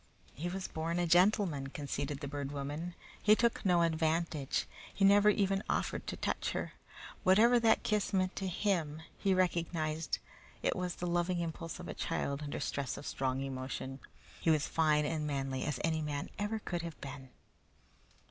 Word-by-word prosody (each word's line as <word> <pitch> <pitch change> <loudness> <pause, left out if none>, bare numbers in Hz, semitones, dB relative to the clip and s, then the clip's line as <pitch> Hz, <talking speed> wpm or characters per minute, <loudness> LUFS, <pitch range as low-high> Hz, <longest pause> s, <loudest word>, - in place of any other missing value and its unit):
"He 170 +6 -3
was 190 +1 -3
born 165 +2 -2
a 175 - +2
gentleman," 175 -4 +3
conceded 140 0 -4
the 140 - -3
Bird 140 -1 -4
Woman. 145 +5 -4 0.3
"He 215 +1 +6
took 235 +1 +1
no 175 -4 +4
advantage. 160 -3 0 0.3
He 195 - +2
never 205 +1 +7
even 195 -1 +2
offered - - -1
to - - -3
touch - - -1
her. - - -3 0.5
Whatever 225 +6 +6
that 225 -1 +4
kiss 210 -2 +1
meant 185 -2 +1
to 195 - -1
him, 165 -5 0 0.2
he 195 -1 +3
recognized 165 -3 0 0.5
that - - +3
it - - 0
was 180 -1 -2
the 180 - -4
loving 175 +1 +1
impulse 165 -1 -4
of - - -7
a - - -4
child 140 +1 -2
under 145 -1 -4
stress 140 -2 -2
of 145 - -8
strong 130 0 -1
emotion. 135 0 -4 0.4
He - - +1
was 155 -2 +4
fine 150 -2 +3
and 150 0 -1
manly 135 -2 -2
as 150 -3 -2
any 160 -1 +1
man 145 -2 -3
ever 210 +2 -1
could 175 -5 -3
have 165 -2 -7
been." 135 -1 -8
165 Hz, 175 wpm, -33 LUFS, 145-185 Hz, 0.5 s, never